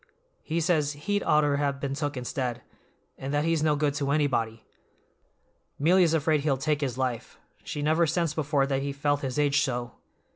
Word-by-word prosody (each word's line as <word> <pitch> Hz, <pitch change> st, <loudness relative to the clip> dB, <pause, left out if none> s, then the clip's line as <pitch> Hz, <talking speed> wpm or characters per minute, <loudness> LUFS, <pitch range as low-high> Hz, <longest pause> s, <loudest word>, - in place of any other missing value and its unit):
He 165 Hz, +2 st, -2 dB
says 155 Hz, -3 st, +1 dB
he'd 205 Hz, +8 st, -2 dB
oughter 150 Hz, -2 st, +3 dB
have 140 Hz, -1 st, -1 dB
been 140 Hz, -1 st, -3 dB
took 145 Hz, -1 st, -3 dB
instead, 125 Hz, -1 st, -3 dB, 0.6 s
and 135 Hz, +1 st, -4 dB
that 145 Hz, +1 st, +1 dB
he's 165 Hz, -2 st, +1 dB
no 155 Hz, -1 st, +3 dB
good 145 Hz, -1 st, +1 dB
to 140 Hz, -1 st, -2 dB
anybody. 120 Hz, -7 st, 0 dB, 1.1 s
'Melia's 170 Hz, +2 st, +4 dB
afraid 155 Hz, -1 st, +2 dB
he'll 140 Hz, -2 st, +1 dB
take 150 Hz, +2 st, 0 dB
his 130 Hz, -4 st, -2 dB
life; 125 Hz, -3 st, -3 dB, 0.3 s
she 145 Hz, -, -4 dB
never 160 Hz, +2 st, +3 dB
sensed 165 Hz, 0 st, 0 dB
before 145 Hz, -2 st, +1 dB
that 135 Hz, -1 st, -1 dB
he 140 Hz, 0 st, -3 dB
felt 145 Hz, +1 st, 0 dB
his 135 Hz, 0 st, -3 dB
age 145 Hz, -1 st, +3 dB
so." 120 Hz, -3 st, -2 dB
145 Hz, 180 wpm, -27 LUFS, 135-155 Hz, 1.1 s, Melia's